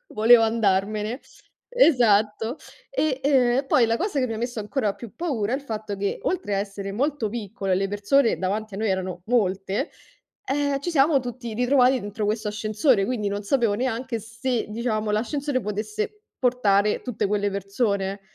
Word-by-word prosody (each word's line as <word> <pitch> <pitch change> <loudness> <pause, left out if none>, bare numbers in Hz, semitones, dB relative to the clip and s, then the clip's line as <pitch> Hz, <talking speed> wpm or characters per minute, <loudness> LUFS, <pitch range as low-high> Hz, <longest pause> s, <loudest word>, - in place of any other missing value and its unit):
volevo 225 +2 +6
andarmene. 215 +1 0 0.5
Esatto. 230 - +3 0.3
E, 305 - 0
ehm, 255 -3 +3
e 270 - 0
poi 250 -3 +4
la 230 +1 +1
cosa 390 - -2
che 255 - +1
mi 225 - -4
ha - - -4
messo 240 -1 -3
ancora 210 -1 -1
più 230 0 -11
paura 245 -11 -2
è 265 - +2
il 280 - -8
fatto 215 -5 -5
che, 200 0 -2
oltre 360 - -1
a - - +1
essere 195 0 -4
molto 270 -1 -1
piccolo 205 -3 -4
e - - +5
le 195 +1 0
persone 210 +5 +2
davanti 205 +2 -2
a - - -5
noi 220 -1 0
erano 185 -2 -2
molte, 200 - 0 0.5
ehm, 285 0 0
ci 345 - -3
siamo 285 -2 +4
tutti 245 -1 -6
ritrovati 250 +1 +3
dentro 205 +1 -4
questo 215 0 -1
ascensore, 215 +1 +1
quindi 230 -5 -1
non 200 +1 -3
sapevo 230 -1 +1
neanche 240 0 -2
se, 230 +3 -3
diciamo, 215 -1 -2
l'ascensore 260 +5 -1
potesse 215 - -4 0.2
portare 210 -5 +2
tutte 245 -5 -2
quelle 205 0 0
persone. 200 0 -1
225 Hz, 175 wpm, -24 LUFS, 205-255 Hz, 0.5 s, volevo